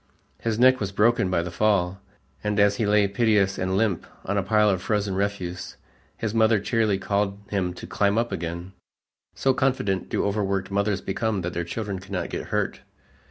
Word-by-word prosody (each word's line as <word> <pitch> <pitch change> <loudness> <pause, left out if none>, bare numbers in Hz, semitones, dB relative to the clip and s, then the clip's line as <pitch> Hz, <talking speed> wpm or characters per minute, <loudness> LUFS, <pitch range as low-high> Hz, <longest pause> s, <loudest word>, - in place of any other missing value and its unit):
His 115 -2 -1
neck 130 +2 +5
was 100 -2 -2
broken 105 -1 +3
by 85 -2 +1
the 90 - -5
fall, 95 -1 +1 0.4
and 105 -1 0
as 100 0 +4
he 110 - 0
lay 105 -1 +4
piteous 100 -2 +2
and 95 +1 0
limp 105 -5 0 0.2
on 100 - -1
a 100 - +2
pile 105 +2 +3
of 95 -3 +1
frozen 105 -1 0
refuse, 95 -2 -3 0.4
his 110 -2 -2
mother 110 -1 +4
cheerily 110 -1 +1
called 100 0 -1
him 95 -3 0
to - - -8
"climb 100 +1 +1
up 120 +1 0
again," 85 +2 -4 0.6
so 135 - +2
confident 125 -8 0
do - - 0
overworked 100 -2 -1
mothers 100 0 0
become 105 0 -1
that 90 0 -4
their 85 - -2
children 100 +1 -4
cannot 95 -2 -4
get - - -4
hurt. - - -1
100 Hz, 185 wpm, -25 LUFS, 95-110 Hz, 0.6 s, neck